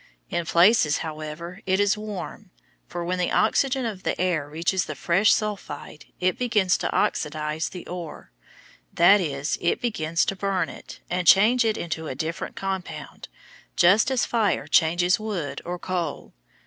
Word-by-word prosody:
In 170 -1 -2
places, 170 -3 +4
however, 160 +4 -7
it 190 +1 +2
is 205 0 +3
warm, 210 -1 -7 0.4
for 175 0 -5
when 180 +1 -2
the 180 - +1
oxygen 265 +3 +2
of 210 -5 -4
the - - -2
air 170 -5 0
reaches 165 +3 0
the 155 - -6
fresh 185 +9 +3
sulphide 195 -8 -3
it 185 0 0
begins 210 -7 +2
to - - -2
oxidize 150 +1 -1
the 180 - -9
ore; 170 - -8 0.6
that 190 +4 +5
is, 145 -3 -2
it 170 - +1
begins 165 -8 0
to 195 - -2
burn 195 -1 -1
it, - - -11
and 180 -1 -2
change 215 - +6
it 220 -1 0
into 160 -1 -4
a 130 - -4
different 160 +5 -4
compound, 190 -2 -5 0.5
just 190 +8 +5
as 260 -2 +1
fire 225 -4 0
changes 175 +3 +3
wood 200 -9 -4
or 175 +1 -4
coal. 175 -4 -4
180 Hz, 160 wpm, -24 LUFS, 160-205 Hz, 0.6 s, change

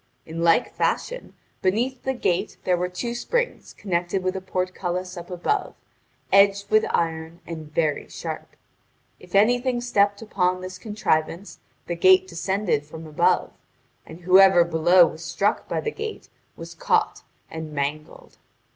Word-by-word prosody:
In 165 +1 -6
like 165 -1 +3
fashion, - - -2 0.3
beneath 240 +7 0
the 265 0 -2
gate 180 -7 -1
there 180 - +2
were 180 +1 -2
two 235 +6 -4
springs 480 - -2
connected 180 0 -2
with 185 +1 -1
a 190 - -4
portcullis 185 0 -3
up 175 -1 -9
above, 185 - -2 0.6
edged 200 0 +4
with 215 0 +4
iron 165 0 -2
and 160 -2 -8
very 155 -2 -1
sharp. - - -7 0.6
If 180 +1 -10
anything 245 +4 +3
stepped 205 -4 +1
upon 185 -4 0
this 185 0 -8
contrivance 195 -3 -2 0.3
the 175 - -3
gate 185 +2 +5
descended 185 -2 -1
from 160 +2 -10
above, 155 -1 +1 0.5
and 160 +2 -12
whoever 185 0 +6
below 170 +2 +5
was 160 0 -6
struck 205 +5 -1
by - - -2
the 450 - -3
gate 440 0 -7 0.3
was - - -9
caught - - 0 0.3
and 160 -1 -6
mangled. 150 +1 -5
185 Hz, 145 wpm, -24 LUFS, 170-205 Hz, 0.6 s, whoever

